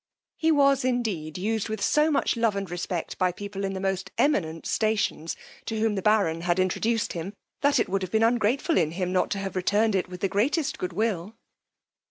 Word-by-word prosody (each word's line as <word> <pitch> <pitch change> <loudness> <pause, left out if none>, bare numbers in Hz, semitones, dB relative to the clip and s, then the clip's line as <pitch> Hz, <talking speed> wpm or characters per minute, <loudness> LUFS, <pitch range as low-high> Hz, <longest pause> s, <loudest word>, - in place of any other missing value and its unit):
He 320 0 +2
was 275 -3 +4
indeed 215 -12 -1
used 220 +3 -1
with 220 -1 -3
so 300 +9 +3
much 290 - +1
love 230 -3 +1
and 200 -1 -3
respect 175 -1 -4
by 185 -1 +3
people 200 +2 -6
in 195 0 -1
the 190 - -4
most 190 -1 -2
eminent 165 - +1
stations, 215 -7 0 0.3
to 220 -1 -3
whom 220 -1 +2
the 195 - -2
baron 195 -6 +2
had 175 +1 +1
introduced 215 +5 0
him, 180 +4 -5 0.3
that 285 -2 +3
it - - +1
would 195 +1 -1
have 185 - -3
been 220 0 +3
ungrateful 240 +7 +2
in 160 -2 0
him 180 0 -2
not 185 - +2
to 205 - -2
have 195 -1 -4
returned 205 +4 +2
it 185 -1 0
with 180 -1 -9
the 195 - +2
greatest 270 - 0
good 180 -1 -3
will. 210 0 -1
200 Hz, 210 wpm, -26 LUFS, 185-225 Hz, 0.3 s, was